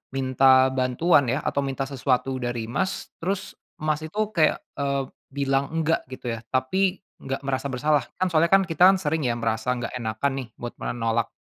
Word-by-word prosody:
minta 130 0 +5
bantuan 135 +4 +3
ya 140 - 0
atau 140 - -1
minta 135 0 -2
sesuatu 130 -1 0
dari 120 -2 -2
Mas, 190 +10 -2
terus 190 +3 -3 0.3
Mas 155 0 0
itu 185 +7 -6 0.2
kayak, 155 -2 +3 0.2
eee, 140 -1 0 0.3
bilang 140 -1 +1
enggak 165 0 +1
gitu 130 -1 -7
ya, 115 - -5
tapi 185 +9 +1 0.2
nggak 135 +1 -4
merasa 135 0 -1
bersalah. 150 +3 +2 0.2
Kan 185 - +2
soalnya 165 0 +3
kan 195 0 +7
kita 165 0 +2 0.2
sering 160 0 0
ya - - +1
merasa 115 +2 0
nggak 120 - -5
enakan 115 +4 -1
nih, 130 - -6
buat 120 - -5
menolak. 115 -1 -1
135 Hz, 175 wpm, -25 LUFS, 125-155 Hz, 0.3 s, kan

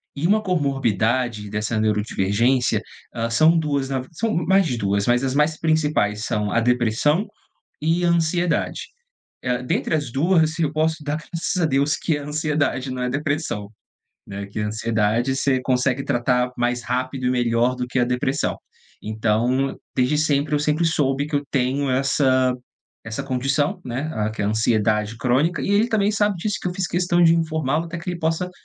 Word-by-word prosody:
e 145 +3 -2
uma 215 +4 +3
comorbidade 125 - 0
dessa 105 +1 -2
neurodivergência, 110 +2 +1 0.3
hã, 115 -1 -2
são 155 +8 +4
2 140 -4 -1
na 135 -1 -1
v 130 - -8
são 220 +7 -2
mais 190 +3 +3
de 125 -6 -2
2, 100 -1 0
mas 120 +2 +2
as 135 0 -1
mais 150 +1 +2
principais 150 -10 +1
são 105 -1 -1
a 115 - +2
depressão 125 - +1 0.5
e 165 +3 +1
a - - +3
ansiedade. 170 +1 0 0.6
Eh, 125 0 -1
dentre 125 - -1
as 145 -6 -2
2 160 +2 +2
eu 155 -3 +1
posso 155 0 0
dar 150 +1 -2
graças 170 +2 -3
a - - +3
Deus 145 +1 +1
que 160 - 0
é - - -3
a - - -8
ansiedade 150 -3 -1
não 130 - -4
é 125 - -1
depressão, 145 -7 -2 0.6
né, 100 0 -6
que 100 - -7
a 105 - -1
ansiedade 110 +3 0
você 135 -2 +1
consegue 130 +1 0
tratar 125 -1 +1
mais 120 0 0
rápido 130 +2 -2
e 125 - +2
melhor 120 0 +1
do 125 0 -3
que 125 +1 -2
a 120 - +4
depressão. 125 +3 -1 0.5
Então, 115 +5 0 0.2
desde 130 +4 +2
sempre 150 -1 +1
eu - - +3
sempre 150 +3 +1
soube 145 -3 +1
que 150 - -6
eu 140 - 0
tenho 135 +1 0
essa 130 -1 +2 0.5
essa 110 -1 -4
condição, 140 +7 -1
né, 130 +6 -3
ah 105 0 -1
que 110 - -4
é - - 0
ansiedade 110 0 +1
crônica 135 +6 +1
e - - -1
ele 210 +3 +3
também 210 -2 +2
sabe 205 -2 +1
disso 205 +4 -2
que 180 - -2
eu 180 - -5
fiz 190 -1 -1
questão 175 0 +1
de 165 0 +6
informá-lo 160 -2 0
até 170 0 -6
que 180 +2 -5
ele 175 - -5
possa 165 +2 -1
135 Hz, 185 wpm, -22 LUFS, 120-160 Hz, 0.6 s, de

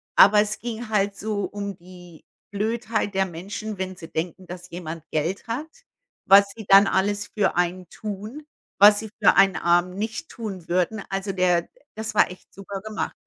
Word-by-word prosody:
Aber 210 +2 +7
es 210 0 -2
ging 235 -1 -6
halt 200 -2 +1
so 210 -1 -2
um 200 -2 -6
die 175 -2 -15 0.3
Blödheit 220 0 -2
der 195 0 +2
Menschen, 195 +5 -6
wenn 185 0 -4
sie 165 - -10
denken, 175 +3 -4
dass 180 +1 -9
jemand 165 -2 -7
Geld 165 +9 -2
hat. 255 +8 -3 0.6
Was 200 +1 +7
Sie 220 - -9
dann 195 0 +7
alles 205 +3 0
für 210 -3 0
einen 180 0 -1
tun, 215 +8 -7 0.3
was 205 +1 +8
sie 220 - -7
für - - +6
einen 195 -1 +5
Armen 175 +1 +2
nicht 220 +9 -4
tun 200 -8 -7
würden. 185 +4 0
Also, 195 0 -3
der 180 -2 +1 0.3
das 220 0 -4
war 205 - +4
echt 180 - -14
super 195 0 -7
gemacht. 215 +1 -4
195 Hz, 175 wpm, -24 LUFS, 180-215 Hz, 0.6 s, was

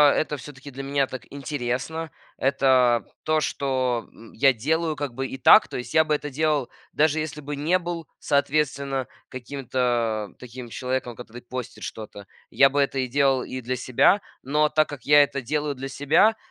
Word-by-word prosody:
это 150 -1 -1
всё-таки 140 0 -11
для 135 +2 -7
меня 140 0 +1
так 130 - -7
интересно. 140 +3 -3 0.3
Это 130 -3 +3 0.2
то, 155 0 +1
что, 130 -5 -1
м, 115 - -15
я 135 +3 +4
делаю 155 +6 0
как 145 -4 -4
бы 135 +1 -3
и 135 - -7
так. 130 - +7
То - - -6
есть 125 -1 -7
я 160 0 +5
бы 150 - +1
это 150 0 -4
делал, 150 -2 0 0.2
даже 155 +1 +2
если 150 -1 -4
бы 145 0 -5
не 170 +6 +2
был, 170 -2 -5
соответственно, 140 -2 0 0.2
каким-то 120 -5 -2
таким 125 -1 -9
человеком, 125 -1 -3
который 120 0 -10
постит 125 0 -7
что-то. 105 -2 -8 0.2
Я 135 0 +5
бы 145 +1 -1
это 135 -1 0
и 130 - 0
делал 135 0 +2
и 130 - -6
для 125 +2 -2
себя. 130 - +3 0.2
Но 150 +3 +1
так 155 0 +2
как 145 -5 -9
я 145 0 +7
это 140 -1 -3
делаю 145 +3 -2
для 135 +1 -6
себя, 150 +11 +3
135 Hz, 180 wpm, -24 LUFS, 125-150 Hz, 0.3 s, так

